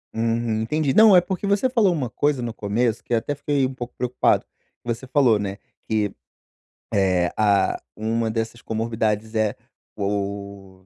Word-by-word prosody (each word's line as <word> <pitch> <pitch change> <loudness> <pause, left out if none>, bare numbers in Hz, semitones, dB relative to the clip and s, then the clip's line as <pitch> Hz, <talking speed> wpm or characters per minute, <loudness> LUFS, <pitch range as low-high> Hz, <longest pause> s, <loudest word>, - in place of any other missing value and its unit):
Uhum, 115 -1 0
entendi. 145 +4 0
Não, 215 -3 +7
é 180 - +8
porque 190 +2 -3
você 200 +5 +2
falou 225 -7 +3
uma 145 -8 -1
coisa 145 -3 0
no 115 -1 -3
começo, 110 +3 -1
que 120 - -1
até 130 +6 -1
fiquei 140 -1 0
um 130 - -3
pouco 125 -1 -7
preocupado. 125 0 +1 0.4
Você 120 +2 -4
falou, 130 -6 +3
né, 100 -1 -4 0.3
que, 105 -2 0 0.8
eh, 90 -3 +2
ah, 105 -2 +2
uma 110 +1 -1
dessas 115 +1 -3
comorbidades 110 -1 -2
é, 110 -2 +1 0.4
o 100 -1 -4
115 Hz, 155 wpm, -23 LUFS, 105-130 Hz, 0.8 s, é